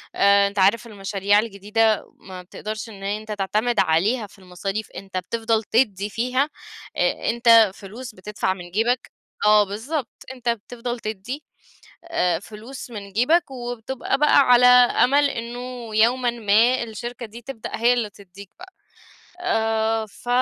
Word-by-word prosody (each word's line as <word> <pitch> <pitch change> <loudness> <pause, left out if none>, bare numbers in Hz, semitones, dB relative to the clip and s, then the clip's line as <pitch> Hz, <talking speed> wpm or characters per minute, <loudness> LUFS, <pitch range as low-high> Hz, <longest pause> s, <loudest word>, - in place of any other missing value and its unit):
آآ 200 0 +5
أنت 200 0 -4
عارف 210 +5 +3
المشاريع 200 0 +1
الجديدة 215 0 0
ما 185 -1 -10
بتقدرش 215 +5 -7
إن 195 -2 -11
أنت 210 +2 -4
تعتمد 215 +4 0
عليها 205 +8 +2
في 200 - -20
المصاريف، 195 +3 -5
أنت 190 -1 -7
بتفضل 225 +3 -1
تدّي 205 -4 +1
فيها، 255 +7 0 0.5
أ - - 0
أنت 230 -3 +6
فلوس 225 +5 -10
بتدفع 190 0 -2
من 175 -2 -11
جيبك 235 +5 0 0.3
آه 210 0 +6
بالضبط. 230 +7 -4 0.2
أنت 245 -2 -3
بتفضل 235 +2 -4
تدّي 220 +8 -6 0.6
آآ 180 - 0
فلوس 220 +7 -10
من 200 -3 -8
جيبك 280 +7 +2
وبتبقى 245 +1 -3
بقى 300 0 +5
على 250 -2 +6
أمَل 250 +3 +5
إنه 240 -1 -6
يومًا 240 +3 +3
ما 235 +3 +3
الشركة 235 +1 -7
دي 230 +2 -11
تبدأ 235 -2 -7
هي 235 +2 +3
اللي 235 -4 -1
تدّيك 200 0 -14
بقى. 375 +1 -12 0.7
آآ 225 -7 0
ف 215 +3 -18
225 Hz, 140 wpm, -23 LUFS, 200-245 Hz, 0.7 s, أنت